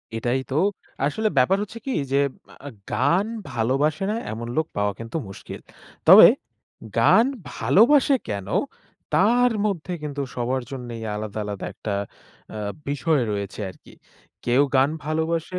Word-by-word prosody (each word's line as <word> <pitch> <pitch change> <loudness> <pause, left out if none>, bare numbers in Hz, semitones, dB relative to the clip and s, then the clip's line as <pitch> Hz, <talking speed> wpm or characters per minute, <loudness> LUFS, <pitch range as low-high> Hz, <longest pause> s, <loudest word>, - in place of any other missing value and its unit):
এটাই 120 +3 0
তো 135 - -1 0.5
আসলে 215 +10 0
ব্যাপার 155 +10 +4
হচ্ছে 210 +2 -9
কি 270 - -2 0.2
যে 140 - +3 0.5
আ - - -4 0.2
গান 155 - +2 0.2
ভালোবাসে 135 +9 0
না - - -1 0.2
এমন 115 +2 -5
লোক 160 - +1
পাওয়া 105 0 +1
কিন্তু 115 +7 -5
মুশকিল। 95 - -9 0.5
তবে - - +11 0.7
গান 220 - +6 0.3
ভালোবাসে 230 - +4
কেন? 100 -2 -4 0.7
তার 240 +4 +4
মধ্যে 185 -4 -2
কিন্তু 145 -1 -4
সবার 125 +1 -1
জন্যই 120 -4 -6
আলাদা-আলাদা 105 -1 -5
একটা 105 - -5 0.6
আ - - -5 0.3
বিষয় 145 +1 +1
রয়েছে 100 0 -4
আরকি। - - -17 0.5
কেউ 125 +4 +4
গান 135 +2 +4
ভালোবাসে 160 +3 -1
135 Hz, 130 wpm, -23 LUFS, 115-170 Hz, 0.7 s, তবে